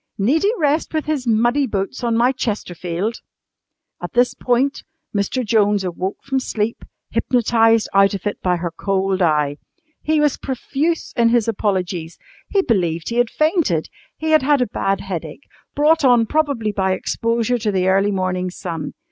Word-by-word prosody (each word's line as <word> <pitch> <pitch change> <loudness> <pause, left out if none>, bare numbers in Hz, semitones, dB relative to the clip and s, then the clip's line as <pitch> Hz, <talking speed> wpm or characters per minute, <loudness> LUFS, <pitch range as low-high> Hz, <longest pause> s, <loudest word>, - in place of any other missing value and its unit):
"Need 255 +11 +2
he 410 - +3
rest 305 +1 0
with 310 - -1
his 290 -5 -2
muddy 240 +5 +2
boots 205 +4 -3
on 230 -1 +1
my 245 +2 +4
chesterfield?" 205 -4 -3 0.8
At 175 - -6
this 245 0 +3
point 255 +3 0 0.3
Mr. 205 +5 -1
Jones 205 -2 +2
awoke 185 +2 -4
from 270 -1 -1
sleep, 225 -3 -3 0.3
hypnotised 225 -2 +2
out 195 0 +4
of 195 - -7
it 205 - -3
by 180 -1 +1
her 170 0 -3
cold 195 +2 -1
eye. 150 -4 +2 0.4
He 310 0 +1
was 295 -2 +2
profuse 285 +5 -2
in 235 -1 +4
his 235 -2 +2
apologies. 185 -6 -2 0.3
He 395 -1 +2
believed 170 - 0
he 235 - -3
had 245 -1 +3
fainted. 305 - +1 0.3
He 315 0 -2
had 310 - +5
had 285 +1 +3
a 250 - +2
bad 195 -2 -1
headache, 190 - -6 0.3
brought 305 +2 +3
on 245 -3 +5
probably 280 -6 0
by 190 -2 0
exposure 230 +5 -1
to 215 -2 0
the 185 -1 0
early 195 +2 +3
morning 185 -2 -1
sun. 170 -4 -6
225 Hz, 165 wpm, -20 LUFS, 190-260 Hz, 0.8 s, had